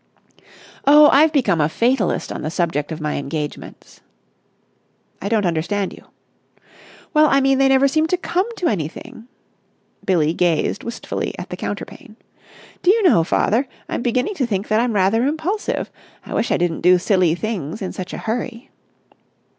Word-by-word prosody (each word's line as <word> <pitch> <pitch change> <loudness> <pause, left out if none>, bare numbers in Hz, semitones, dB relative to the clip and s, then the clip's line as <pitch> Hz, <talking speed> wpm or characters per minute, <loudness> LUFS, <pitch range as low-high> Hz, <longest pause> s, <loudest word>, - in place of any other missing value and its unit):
"Oh, 295 +1 +8
I've 305 +3 +5
become 210 - +2
a 150 - +2
fatalist 235 +2 0
on - - -5
the 155 - -3
subject 165 -3 -2
of 160 - -5
my 150 -1 -2
engagements." 145 +1 -6 1.2
"I 200 - -3
don't 215 -3 +1
understand 180 +4 -1
you." - - -14 1.1
"Well, 305 0 +5
I 275 - +4
mean, 270 0 +2
they 270 - +4
never 270 +1 +4
seem 310 +3 +1
to 365 - 0
come 365 +3 -1
to 360 - -1
anything." 200 +5 -5 0.8
Billie 165 -4 +1
gazed 175 +2 0
wistfully 235 - -4
at - - -8
the - - -3
counterpane. - - -7 0.7
"Do 355 - +2
you 435 +2 +4
know, 295 - +5
father, 225 - +1 0.2
I'm - - -3
beginning 250 - 0
to 260 - 0
think 200 -3 -3
that 215 0 +3
I'm 240 0 0
rather 205 +4 +2
impulsive. 320 +8 -2 0.3
I - - -7
wish 220 - 0
I - - +3
didn't 175 -2 -1
do 180 +1 +5
silly 180 -3 +2
things 200 -3 -4
in 190 - -5
such 185 0 -6
a - - -5
hurry." 235 +2 -4
215 Hz, 165 wpm, -20 LUFS, 175-270 Hz, 1.2 s, Oh